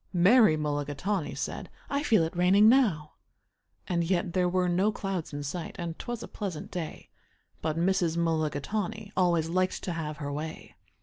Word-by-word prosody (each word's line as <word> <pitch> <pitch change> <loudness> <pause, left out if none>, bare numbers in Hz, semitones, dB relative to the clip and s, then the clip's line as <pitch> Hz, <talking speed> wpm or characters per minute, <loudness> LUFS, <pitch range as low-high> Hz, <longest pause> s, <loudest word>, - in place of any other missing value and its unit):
Mary 185 -1 +6
Mulligatawny 150 +5 -2
said, - - -4 0.2
"I 280 0 -1
feel 225 - +3
it 160 - -3
raining 190 +4 +5
now." 210 - +3 0.8
And 170 -2 +1
yet 175 +1 0
there 180 -1 +2
were 180 0 +1
no 185 +4 +2
clouds 195 -5 -4
in 145 0 -5
sight, 160 +4 -5
and 170 -2 -5
'twas 240 -1 -5
a - - -7
pleasant 190 -7 -6
day, 170 -3 -6 0.5
But 155 0 -1
Mrs. 175 -1 +1
Mulligatawny 170 +6 -1
always 175 -3 +2
liked 185 +2 0
to 185 - -2
have 155 -2 -4
her 145 -1 -4
way. 155 +2 -6
175 Hz, 165 wpm, -28 LUFS, 160-195 Hz, 0.8 s, Mary